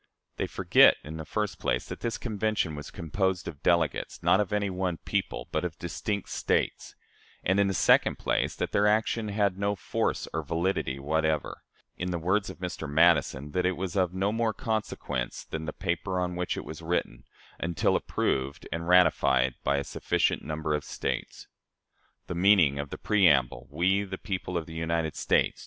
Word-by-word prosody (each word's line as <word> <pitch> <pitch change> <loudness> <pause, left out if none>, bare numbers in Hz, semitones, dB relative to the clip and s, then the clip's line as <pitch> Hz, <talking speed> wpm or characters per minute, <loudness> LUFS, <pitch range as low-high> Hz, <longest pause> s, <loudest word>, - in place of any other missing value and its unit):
They - - -1
forget, - - +5
in 80 +2 -7
the 80 - -6
first 105 +5 -2
place, 60 - -1
that - - -7
this 115 - -2
Convention 110 -6 -1
was 75 0 -7
composed 90 +3 -2
of 70 -3 -7
delegates, 85 -5 0
not 95 - +5
of 105 -1 0
any 100 -1 0
one 90 -2 -2
people, - - -3
but 80 - -1
of 85 -2 -4
distinct 100 +4 -3
States; - - -1 0.5
and, 95 +2 +2
in 100 - +4
the 95 - 0
second - - +4
place, - - 0
that - - -3
their 105 +1 +3
action 110 +1 +1
had 100 -2 0
no 100 0 0
force - - -2
or - - -1
validity 85 -5 -1
whatever 80 +2 -1 0.4
in 90 - -3
the 90 - -1
words 95 +5 0
of - - -8
Mr. 90 -4 -5
Madison, 75 -3 +3
that 90 +4 0
it 95 - -1
was 95 0 -4
of 90 -3 +2
no 95 +2 0
more 115 -1 0
consequence 110 - -3
than 80 0 -5
the 80 - -3
paper 90 +2 -2
on 90 -1 -2
which 90 0 -2
it - - -5
was 80 +1 -8
written 85 +2 -2 0.3
until 85 -1 +1
approved 70 +1 -1
and 85 +2 -3
ratified 65 -8 +4
by 70 - +2
a 70 - -1
sufficient - - 0
number 75 0 -2
of 75 -1 -1
States. - - -4 0.8
The - - -5
meaning 85 -6 +4
of 70 -1 -4
the - - -6
preamble, 70 - +3
"We, 90 +7 +2
the 95 -1 -6
people 90 -3 -3
of 80 - -3
the 80 - -10
United 80 -1 -1
States - - +1
85 Hz, 185 wpm, -28 LUFS, 80-100 Hz, 0.8 s, forget